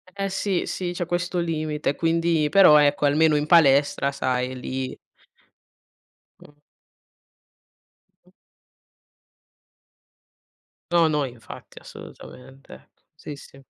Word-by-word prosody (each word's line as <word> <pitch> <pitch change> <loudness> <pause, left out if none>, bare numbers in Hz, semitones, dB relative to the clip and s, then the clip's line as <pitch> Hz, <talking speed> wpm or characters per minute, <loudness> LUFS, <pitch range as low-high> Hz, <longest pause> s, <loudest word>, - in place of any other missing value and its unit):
Eh 195 0 -3
sì, 195 -1 -2
sì, 180 -1 -4
c'ho 175 0 -4
questo 175 +1 -3
limite 155 -3 -3
quindi 165 -1 0
però 185 -5 +6
ecco, 145 0 +2
almeno 155 +2 +2
in 145 - -2
palestra, 140 -3 +3
sai 130 -2 -3
lì 130 +1 -5 1.4
Mh. 145 - -18 1.7
Mh. - - -26 2.6
No, 170 -1 +3
no, 150 -2 -1
infatti, 120 -3 -12
assolutamente. 130 - -14 0.2
Sì, 155 -1 -9
sì. 135 0 -16
150 Hz, 95 wpm, -23 LUFS, 135-170 Hz, 2.6 s, però